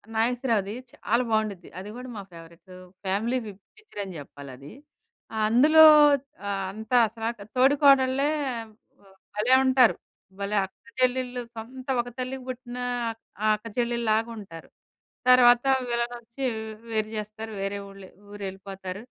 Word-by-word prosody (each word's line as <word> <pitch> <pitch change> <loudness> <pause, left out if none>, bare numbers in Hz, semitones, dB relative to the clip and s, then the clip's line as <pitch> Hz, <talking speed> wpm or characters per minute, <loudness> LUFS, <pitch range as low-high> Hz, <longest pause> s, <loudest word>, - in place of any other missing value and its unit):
నాగేశ్వరావుది 230 -3 0 0.2
చాలా 235 +3 0
బావుండుద్ది. 215 -5 -1
అది 195 +2 -8
గూడా 250 +1 -8
మా 200 - -6
ఫేవరెట్టూ, 170 +2 -14 0.3
ఫ్యామిలీ 220 +7 0
ఫి 210 - -6 0.3
పిక్చరని 205 - -8
జెప్పాలది. 140 -1 -11 0.8
అందులో 295 +8 +6 0.6
ఆహ్, 195 -1 -2
అంతా 220 +4 -1
అసలా 225 +1 -4 0.3
తోడి 265 +3 +5
కోడళ్ళే 275 0 +5 0.3
ఆహ్, 225 -1 -12 0.6
భలే 225 +5 +2
ఉంటారు, 255 -3 +5 0.4
భలే 200 +1 -1
అక్కచెల్లెళ్ళు, 255 +2 -2
సొంత 255 +4 -9
ఒక 240 - -11
తల్లికి 255 +1 -4
బుట్టినా 250 -1 -6 0.6
ఆహ్, 215 - +5
అక్కచెల్లిల్లాగుంటారు. 225 -4 -2 0.6
తర్వాతా 250 +1 +6 0.2
విలనొచ్చీ, 235 +2 -3
వ్ 220 +1 -8
వేరు 215 -1 -1
జేస్తారు, 215 +1 -6
వేరే 195 +1 -2
ఊళ్ళె 195 -1 -12 0.2
ఊరెళ్ళిపోతారు. 195 -1 -7
225 Hz, 115 wpm, -26 LUFS, 200-250 Hz, 0.8 s, అందులో